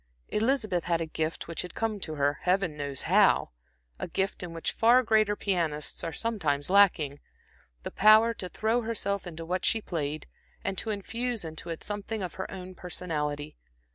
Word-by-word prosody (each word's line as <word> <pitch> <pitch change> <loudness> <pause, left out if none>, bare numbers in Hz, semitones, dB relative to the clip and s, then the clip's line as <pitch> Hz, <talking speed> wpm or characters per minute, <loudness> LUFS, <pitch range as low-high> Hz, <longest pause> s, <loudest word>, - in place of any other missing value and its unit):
Elizabeth 215 -6 +1
had 170 -1 +1
a 165 - -1
gift 160 +1 -3
which 165 -1 -1
had 180 - -8
come 225 -2 -1
to 155 -4 -4
her, 145 0 +1
Heaven 180 -3 +1
knows 140 -2 -2
how! - - +4 0.5
a - - -3
gift 190 +3 -1
in 180 -2 -6
which 165 0 -2
far 240 +3 +5
greater 215 -2 +3
pianists 165 -8 -1
are 165 - -2
sometimes 160 -9 -1
lacking 165 -8 +4 0.6
the - - -5
power 215 +3 +6
to 185 -4 -6
throw 225 +5 0
herself 200 -4 -2
into 165 -1 -7
what 180 +2 -2
she 225 - +3
played 155 -6 -3 0.4
and 195 - -1
to 225 - -4
infuse 225 +1 -2
into 160 +1 -7
it 165 - -5
something 205 0 -3
of 180 - -4
her 190 - -5
own 185 -1 -8
personality. 155 -5 -4
180 Hz, 175 wpm, -28 LUFS, 160-215 Hz, 0.6 s, power